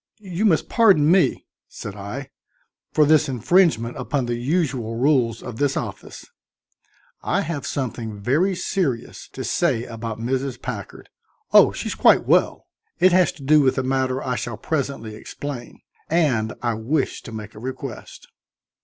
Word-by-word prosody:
"You 195 Hz, 0 st, -3 dB
must 170 Hz, -7 st, +3 dB
pardon 190 Hz, -10 st, +4 dB
me," 185 Hz, -1 st, +3 dB, 0.2 s
said 105 Hz, -, -8 dB
I, 125 Hz, +7 st, -7 dB, 0.6 s
"for 155 Hz, -, +4 dB
this 155 Hz, 0 st, +4 dB
infringement 125 Hz, -, +2 dB
upon 140 Hz, -4 st, -1 dB
the 120 Hz, -, -2 dB
usual 125 Hz, -3 st, -1 dB
rules 120 Hz, -3 st, +1 dB
of 125 Hz, -3 st, -7 dB
this 140 Hz, 0 st, +1 dB
office. -, -, -6 dB, 1.0 s
I -, -, 0 dB
have 155 Hz, -3 st, -4 dB
something 115 Hz, -5 st, -4 dB
very 155 Hz, -, +1 dB
serious 175 Hz, -, -2 dB
to -, -, -5 dB
say 130 Hz, -9 st, 0 dB
about 115 Hz, -1 st, -6 dB
Mrs. 130 Hz, +1 st, -2 dB
Packard 110 Hz, -6 st, -7 dB, 0.4 s
oh, -, -, +8 dB
she's -, -, -4 dB
quite -, -, +4 dB
well; -, -, +2 dB, 0.3 s
it 185 Hz, +2 st, +6 dB
has 180 Hz, 0 st, +4 dB
to 150 Hz, -, -13 dB
do 150 Hz, +2 st, +5 dB
with 135 Hz, -1 st, +2 dB
a 130 Hz, -, +1 dB
matter 130 Hz, 0 st, 0 dB
I 125 Hz, -1 st, -2 dB
shall 120 Hz, -3 st, -4 dB
presently 135 Hz, -4 st, -3 dB
explain 120 Hz, +2 st, -8 dB, 0.3 s
and 130 Hz, -10 st, +1 dB
I 120 Hz, -1 st, +1 dB
wish 125 Hz, +7 st, -1 dB
to -, -, -10 dB
make 110 Hz, -1 st, -8 dB
a -, -, -11 dB
request." 130 Hz, +3 st, -7 dB
130 Hz, 155 wpm, -22 LUFS, 115-155 Hz, 1.0 s, oh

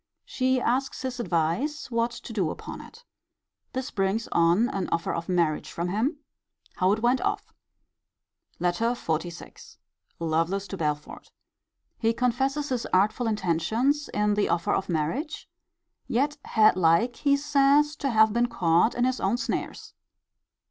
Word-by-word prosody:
She 260 Hz, 0 st, +1 dB
asks 260 Hz, +2 st, -1 dB
his 255 Hz, -1 st, -4 dB
advice 235 Hz, -, -1 dB
what 230 Hz, 0 st, +1 dB
to 235 Hz, -, -9 dB
do 190 Hz, -7 st, 0 dB
upon -, -, -7 dB
it. 460 Hz, +2 st, -15 dB, 0.7 s
This 260 Hz, 0 st, -4 dB
brings 195 Hz, +4 st, -1 dB
on 170 Hz, +7 st, +3 dB
an 195 Hz, -6 st, -3 dB
offer 170 Hz, -, -1 dB
of 170 Hz, +1 st, -4 dB
marriage 170 Hz, -4 st, 0 dB
from 170 Hz, +1 st, -3 dB
him. 230 Hz, -, 0 dB, 0.6 s
How 185 Hz, +1 st, +3 dB
it 220 Hz, +2 st, -3 dB
went 245 Hz, +2 st, +3 dB
off. 405 Hz, +1 st, -2 dB, 1.0 s
LETTER 180 Hz, +7 st, 0 dB
XLVI. 170 Hz, -4 st, -5 dB, 0.4 s
Lovelace 165 Hz, +4 st, 0 dB
to 195 Hz, -, -4 dB
Belford. 150 Hz, -2 st, -4 dB, 0.7 s
He 225 Hz, 0 st, +2 dB
confesses 265 Hz, +5 st, 0 dB
his 250 Hz, -3 st, -2 dB
artful 210 Hz, +6 st, +2 dB
intentions 220 Hz, -, 0 dB
in 210 Hz, 0 st, +1 dB
the 205 Hz, 0 st, +1 dB
offer 170 Hz, 0 st, +1 dB
of 195 Hz, -, -1 dB
marriage: 175 Hz, -, -2 dB, 0.6 s
yet 275 Hz, +4 st, 0 dB
had 215 Hz, -3 st, +4 dB
like, 185 Hz, +8 st, +3 dB
he 280 Hz, -1 st, +2 dB
says, 290 Hz, +1 st, +3 dB
to 275 Hz, -, -1 dB
have 220 Hz, -2 st, +4 dB
been 240 Hz, +1 st, +2 dB
caught 170 Hz, 0 st, +2 dB
in 245 Hz, -, 0 dB
his 255 Hz, +1 st, +1 dB
own 200 Hz, +5 st, +1 dB
snares. 235 Hz, -, -4 dB
225 Hz, 145 wpm, -26 LUFS, 175-260 Hz, 1.0 s, had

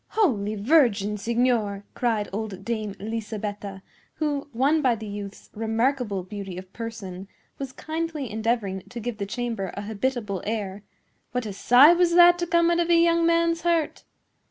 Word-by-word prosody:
"Holy 215 Hz, -, +2 dB
Virgin, 210 Hz, -4 st, +3 dB
signor!" 225 Hz, -2 st, 0 dB
cried 225 Hz, -4 st, 0 dB
old 200 Hz, -2 st, -5 dB
Dame 215 Hz, -4 st, -3 dB
Lisabetta, 210 Hz, -2 st, -5 dB, 0.3 s
who, 290 Hz, -2 st, -2 dB
won 280 Hz, +6 st, +2 dB
by 255 Hz, -4 st, +3 dB
the 220 Hz, 0 st, -8 dB
youth's 205 Hz, -1 st, -8 dB
remarkable 225 Hz, -2 st, 0 dB
beauty 195 Hz, -1 st, -7 dB
of 185 Hz, 0 st, -10 dB
person, 200 Hz, -5 st, -7 dB, 0.3 s
was 270 Hz, -2 st, -5 dB
kindly 315 Hz, -1 st, -4 dB
endeavoring 220 Hz, -3 st, -1 dB
to 245 Hz, -, -7 dB
give 235 Hz, -1 st, -5 dB
the 200 Hz, -, -3 dB
chamber 225 Hz, -4 st, -3 dB
a 200 Hz, -, -4 dB
habitable 215 Hz, -2 st, -2 dB
air, 205 Hz, -2 st, -3 dB, 0.5 s
"what 250 Hz, -2 st, -1 dB
a 205 Hz, -, -5 dB
sigh 250 Hz, -, +7 dB
was 345 Hz, -1 st, +3 dB
that 350 Hz, 0 st, +7 dB
to 345 Hz, -, -1 dB
come 340 Hz, 0 st, +3 dB
out 340 Hz, -, +2 dB
of 345 Hz, 0 st, +1 dB
a 340 Hz, -, +6 dB
young 335 Hz, 0 st, +4 dB
man's 335 Hz, 0 st, +2 dB
heart! 335 Hz, -3 st, 0 dB
230 Hz, 160 wpm, -25 LUFS, 205-290 Hz, 0.5 s, sigh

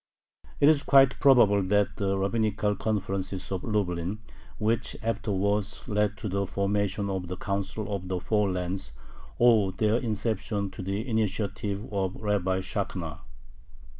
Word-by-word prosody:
It 140 Hz, -, +6 dB
is 155 Hz, -2 st, +5 dB
quite 135 Hz, -1 st, +5 dB
probable 120 Hz, -8 st, +6 dB
that 100 Hz, +2 st, +1 dB
the 100 Hz, -1 st, 0 dB
rabbinical 105 Hz, +1 st, 0 dB
conferences 95 Hz, -3 st, -3 dB
of 95 Hz, -2 st, -2 dB
Lublin, 95 Hz, -3 st, -1 dB, 0.4 s
which 110 Hz, +1 st, -1 dB
afterwards 105 Hz, -2 st, -1 dB
led 105 Hz, 0 st, 0 dB
to 105 Hz, -, -5 dB
the 100 Hz, 0 st, -1 dB
formation 100 Hz, +1 st, 0 dB
of 95 Hz, -2 st, -3 dB
the 90 Hz, +1 st, -5 dB
"Council 100 Hz, +1 st, -3 dB
of 95 Hz, -1 st, -6 dB
the 90 Hz, 0 st, -2 dB
Four 105 Hz, +1 st, +1 dB
Lands," 90 Hz, -4 st, -3 dB, 0.5 s
owe 115 Hz, -5 st, +5 dB
their 105 Hz, +4 st, +1 dB
inception 110 Hz, -3 st, -2 dB
to 95 Hz, -, -8 dB
the 100 Hz, +6 st, -3 dB
initiative 105 Hz, -2 st, -1 dB
of 95 Hz, -2 st, -1 dB
Rabbi 95 Hz, -3 st, 0 dB
Shakhna. 90 Hz, -6 st, -4 dB
100 Hz, 135 wpm, -27 LUFS, 95-110 Hz, 0.5 s, It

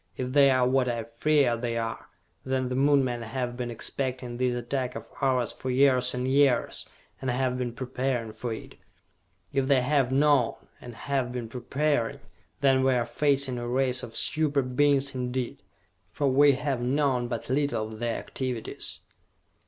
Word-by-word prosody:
If 125 Hz, 0 st, -3 dB
they 140 Hz, -1 st, +6 dB
are 130 Hz, -1 st, +3 dB
what 130 Hz, -1 st, +2 dB
I 115 Hz, -1 st, -2 dB, 0.2 s
fear 145 Hz, -6 st, +3 dB
they 115 Hz, 0 st, -3 dB
are, 115 Hz, 0 st, -4 dB, 0.4 s
then 130 Hz, -1 st, -1 dB
the 125 Hz, -, -2 dB
Moon 140 Hz, +1 st, +4 dB
men 120 Hz, -2 st, -2 dB
have 120 Hz, +2 st, -3 dB
been 120 Hz, -1 st, -4 dB
expecting 125 Hz, +1 st, -3 dB
this 125 Hz, -1 st, +1 dB
attack 125 Hz, +1 st, -3 dB
of 115 Hz, 0 st, -7 dB
ours 130 Hz, -3 st, +1 dB
for 130 Hz, -, -6 dB
years 125 Hz, -1 st, +3 dB
and 125 Hz, +1 st, -2 dB
years, 135 Hz, -2 st, +2 dB, 0.3 s
and 130 Hz, -, -2 dB
have 125 Hz, 0 st, 0 dB
been 125 Hz, -1 st, -2 dB
preparing 125 Hz, -2 st, -2 dB
for 115 Hz, +2 st, -5 dB
it! 110 Hz, -, -8 dB, 0.8 s
If 135 Hz, -1 st, +1 dB
they 135 Hz, -2 st, +4 dB
have 135 Hz, -2 st, +2 dB
known, 140 Hz, -2 st, +3 dB, 0.3 s
and 120 Hz, -2 st, -9 dB
have 135 Hz, -2 st, -2 dB
been 125 Hz, -2 st, -4 dB
preparing, 130 Hz, +1 st, -1 dB, 0.4 s
then 135 Hz, -1 st, +4 dB
we 130 Hz, -1 st, +3 dB
are 120 Hz, -1 st, +1 dB
facing 135 Hz, 0 st, 0 dB
a 120 Hz, -, -4 dB
race 130 Hz, +1 st, 0 dB
of 115 Hz, -2 st, -9 dB
super 145 Hz, -3 st, +1 dB
Beings 140 Hz, +2 st, +2 dB
indeed 125 Hz, -1 st, -3 dB, 0.5 s
for 145 Hz, -, 0 dB
we 140 Hz, +2 st, +5 dB
have 135 Hz, -2 st, -2 dB
known 130 Hz, -1 st, +1 dB
but 120 Hz, -2 st, -4 dB
little 135 Hz, -6 st, 0 dB
of 110 Hz, -, -10 dB
their 120 Hz, -1 st, -1 dB
activities!" 125 Hz, -4 st, -5 dB
130 Hz, 170 wpm, -27 LUFS, 120-135 Hz, 0.8 s, they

